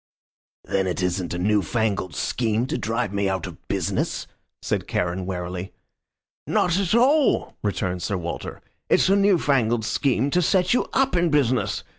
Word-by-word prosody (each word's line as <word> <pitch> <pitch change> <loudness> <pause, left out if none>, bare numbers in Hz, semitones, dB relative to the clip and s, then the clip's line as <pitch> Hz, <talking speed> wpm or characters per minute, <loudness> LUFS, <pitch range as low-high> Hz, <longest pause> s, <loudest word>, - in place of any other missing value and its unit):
"Then 95 -1 -1
it 90 +1 -2
isn't 90 -1 -1
a - - -2
new 105 +3 +2
fangled 100 -3 -1
scheme 115 -1 0
to - - -3
drive 115 -2 -2
me 100 -1 0
out 95 -1 -2
of - - -11
business?" - - -1 0.4
said - - -2
Charon, 90 +1 -2
warily. 90 0 -5 0.7
"Not 180 +1 +2
at 195 +1 +1
all," 275 +4 +3
returned 90 -3 -2
Sir 100 +2 -1
Walter. 85 -1 -6 0.3
"It's - - +4
a 195 - +5
new 200 -2 +4
fangled 120 -7 +1
scheme 135 +2 +1
to 180 - +3
set 180 +4 +2
you 250 - +2
up 270 -4 +2
in 175 -1 +2
business. 130 -5 +1
110 Hz, 165 wpm, -23 LUFS, -, 0.7 s, a